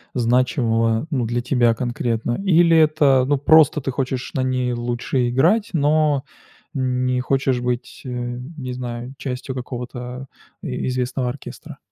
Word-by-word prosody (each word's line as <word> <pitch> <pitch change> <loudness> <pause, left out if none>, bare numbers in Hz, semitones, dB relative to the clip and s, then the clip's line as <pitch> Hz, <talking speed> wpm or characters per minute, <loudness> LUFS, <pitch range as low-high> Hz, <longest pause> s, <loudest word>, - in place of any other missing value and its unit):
значимого, 115 -1 +1
ну, 130 -5 0
для 120 +2 -1
тебя 120 -2 +2
конкретно. 120 -1 -2
Или 170 -3 +5
это, 150 -4 +4
ну, 145 0 +2
просто 150 0 +5
ты 135 - -2
хочешь 130 0 -3
на 135 - 0
ней 125 -1 0
лучше 120 +1 -1
играть, 180 - +2
но 150 -2 +2 0.5
не 125 -1 0
хочешь 130 -1 0
быть, 125 0 -3
э, - - -5 0.5
не 130 -3 -5
знаю, 125 0 -6
частью 130 0 -5
какого-то 125 0 -6 0.4
и 65 - -3
известного 125 0 -1
оркестра? 130 +3 -9
125 Hz, 135 wpm, -21 LUFS, 120-140 Hz, 0.5 s, Или